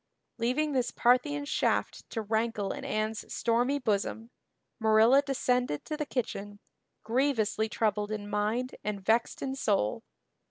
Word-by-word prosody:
Leaving 260 +6 +1
this 250 -3 +1
Parthian 255 +5 +2
shaft - - -1
to 225 - -3
rankle 220 -1 -1
in - - -6
Anne's 215 0 -2
stormy 240 +5 +1
bosom, 225 -1 -1 0.5
Marilla 220 +4 +5
descended 250 - 0
to 305 - -3
the 300 -1 -3
kitchen, 205 -5 -4 0.4
grievously 225 -3 +1
troubled 210 -1 0
in 210 -1 -4
mind 215 +5 -1
and 200 -2 -4
vexed 230 +2 +1
in 265 -1 -2
soul. 200 - 0
230 Hz, 130 wpm, -29 LUFS, 210-255 Hz, 0.5 s, Marilla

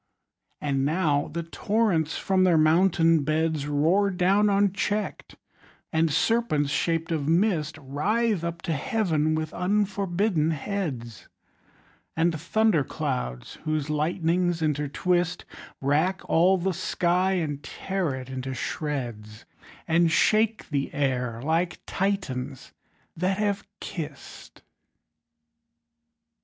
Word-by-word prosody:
And 135 -2 0
now 150 -1 +1
the 170 +2 -3
torrents 175 -2 0
from 190 -1 +2
their 180 -3 +4
mountain 165 0 +4
beds 155 0 0
Roar 165 +8 +2
down 195 +3 +3
uncheck'd; 205 +1 -1 0.6
and 160 0 +2
serpents 160 -3 +1
shaped 165 +1 0
of 150 -3 -1
mist 165 -3 +1
Writhe 195 - 0
up 170 0 -4
to 170 -4 -1
Heaven 155 - 0
with 155 0 -3
unforbidden 190 -3 0
heads; 140 - -4 0.9
And 160 -1 +1
thunder 205 -2 +2
clouds, 130 - -4
whose 155 -1 -1
lightnings 170 +2 0
intertwist, 160 +4 0 0.4
Rack 155 +7 0
all 180 +4 +4
the 185 +1 -1
sky, 180 +1 +1
and 150 -6 -2
tear 190 -6 -3
it 130 -1 -7
into 130 0 -5
shreds, 120 -9 -4 0.4
And 165 0 +3
shake 215 +6 +2
the 140 -1 -1
air 125 -4 -1
like 165 +4 -1
Titians 145 -10 -3 0.4
that 185 +3 0
have 205 -2 -1
kiss'd! 150 -5 -8
165 Hz, 105 wpm, -26 LUFS, 145-190 Hz, 0.9 s, their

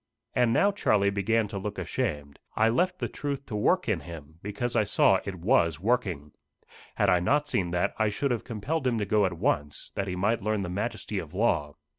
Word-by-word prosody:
And 125 -2 +3
now 200 - +4
Charlie 100 - +2
began 105 +3 +1
to 100 -2 -4
look 100 +1 -5
ashamed. 75 -5 -3 0.2
I 110 +1 +4
left 180 +10 +1
the - - -2
truth 140 -1 -4
to 110 - -6
work 180 - +2
in 105 -6 +1
him, 80 -2 -11
because 105 +4 -3
I - - +4
saw 100 -2 +4
it 95 - -4
was 85 - +2
working. 95 -9 -1 0.6
Had - - +2
I 90 - +4
not 145 +12 +1
seen 95 -11 0
that, 90 0 0
I 110 -1 +3
should 135 +7 -1
have 120 - -1
compelled 130 +6 -2
him 120 -2 +1
to 105 - -1
go 105 -1 +3
at 90 - -4
once, 75 -2 -1
that 100 - -2
he 90 - -3
might 105 +5 +1
learn 105 0 -1
the 90 - -4
majesty 105 +1 -3
of 80 -1 -8
law. 75 -9 +1
105 Hz, 215 wpm, -27 LUFS, 90-120 Hz, 0.6 s, now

